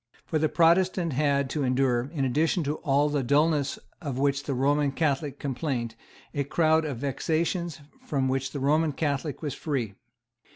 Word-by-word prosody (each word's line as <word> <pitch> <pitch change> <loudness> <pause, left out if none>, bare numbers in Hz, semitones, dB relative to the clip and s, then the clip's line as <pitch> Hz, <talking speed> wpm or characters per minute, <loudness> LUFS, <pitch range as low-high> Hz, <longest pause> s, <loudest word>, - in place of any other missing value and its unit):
For 155 - -1
the 155 0 +2
Protestant 170 0 +3
had 140 0 +1
to 150 - -1
endure, 125 -1 +1
in 140 -5 -1
addition 160 +6 +1
to 150 +1 -2
all 145 +1 +2
the 145 -1 0
dulness 145 +2 +2 0.2
of 140 -6 -4
which 140 +1 +1
the 140 - -2
Roman 140 +2 +2
Catholic 145 -1 -1
complained, 125 -4 -3 0.4
a 145 - 0
crowd 160 +2 +2
of 140 -5 -3
vexations 160 +5 -1 0.3
from 135 -3 0
which 135 0 -1
the 145 - -4
Roman 150 +3 +2
Catholic 145 0 -2
was 145 -3 -2
free. 130 -11 -3
145 Hz, 165 wpm, -27 LUFS, 135-155 Hz, 0.4 s, Protestant